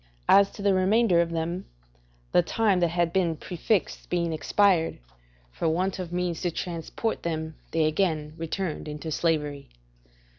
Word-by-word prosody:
As 200 0 +6
to 200 - -8
the 200 -1 +4
remainder 190 -1 +4
of 170 - 0
them, 170 +2 -3 0.7
the - - +5
time 200 +1 +1
that 175 - +3
had 170 0 0
been 175 -4 +2
prefixed 185 +4 -2
being 170 -2 0
expired, 175 +1 +2 0.5
for 160 - -1
want 185 +4 0
of 180 -2 -5
means 175 -2 -2
to 180 - +1
transport 175 +6 -3
them 160 -1 -3 0.2
they 160 -1 +1
again 155 -2 0
returned 165 0 -3
into 150 +2 -5
slavery. 150 -3 -1
170 Hz, 150 wpm, -26 LUFS, 160-185 Hz, 0.7 s, As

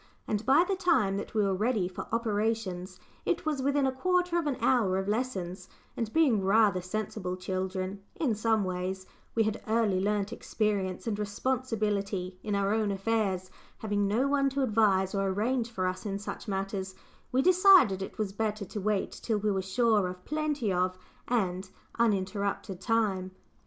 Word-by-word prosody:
And 210 0 -1
by 285 +7 +6
the 390 - +1
time 335 - +2
that 205 - -6
we 215 - +3
were 195 -1 +1
ready 210 -1 +1
for 180 - -7
operations, 210 -5 -1 0.2
it - - -1
was 300 -3 0
within 280 +1 +2
a 265 - +2
quarter 360 +5 +1
of 320 - -2
an 275 -3 -1
hour 215 -10 +3
of 190 0 -2
lessons, 190 -5 -2 0.3
and 225 -2 -3
being 260 -11 +3
rather 200 -1 +4
sensible 185 -1 -4
children 185 +1 -3
in 275 -8 +1
some 220 0 +1
ways 185 +1 -3 0.3
we 225 - +4
had 215 0 -2
early 215 -4 +2
learnt 205 +1 0
experience 200 -4 -1
and 215 -3 -2
responsibility 205 -4 -2
in 210 -1 -2
our 200 +1 +1
own 220 -2 +1
affairs, 195 -2 -1 0.3
having 205 -2 0
no 230 +7 +2
one 275 -1 +2
to 275 0 -1
advise 205 -5 +2
or 195 -1 0
arrange 230 +5 0
for 190 -5 -2
us 185 0 -2
in 200 -2 -2
such 205 +3 -7
matters 195 -1 -3 0.4
we 260 +2 +2
decided 365 - +6
it 195 - -6
was 210 -3 -2
better 215 -1 -2
to 205 +2 -6
wait 205 -1 0
till 220 -2 -2
we 210 0 0
were 190 -1 0
sure 210 +1 +2
of 180 0 -8
plenty 300 -8 -1
of, 185 +1 0 0.3
and 190 -5 -1 0.3
uninterrupted, 200 -3 0
time. 205 -4 +1
210 Hz, 170 wpm, -29 LUFS, 190-230 Hz, 0.4 s, by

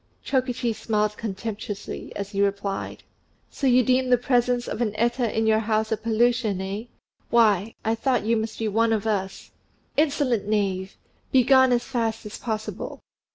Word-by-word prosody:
Chokichi 250 -3 0
smiled 210 -1 -1
contemptuously, 210 -1 -5
as 200 0 -5
he 200 -1 +1
answered, 200 0 -2 0.5
"So 275 - -1
you 250 0 +5
deem 255 +2 +2
the 250 - +5
presence 245 0 +1
of - - -4
an 215 -3 0
Eta 235 0 0
in 220 - +2
your 220 0 +4
house 220 0 0
a - - +3
pollution 230 -2 +1
eh? 195 +4 -4 0.4
Why, 220 -3 +3
I 220 - +2
thought 240 -1 0
you 230 +1 +2
must 220 0 -3
be 225 - -1
one 225 +2 +2
of 215 -1 -1
us." 195 -3 -2 0.5
"Insolent 275 -8 +1
knave! 195 -3 -1 0.3
Begone 260 0 +5
as 240 -1 +2
fast 225 -3 -2
as 210 - -7
possible." 220 -2 -4
225 Hz, 160 wpm, -25 LUFS, 210-245 Hz, 0.5 s, you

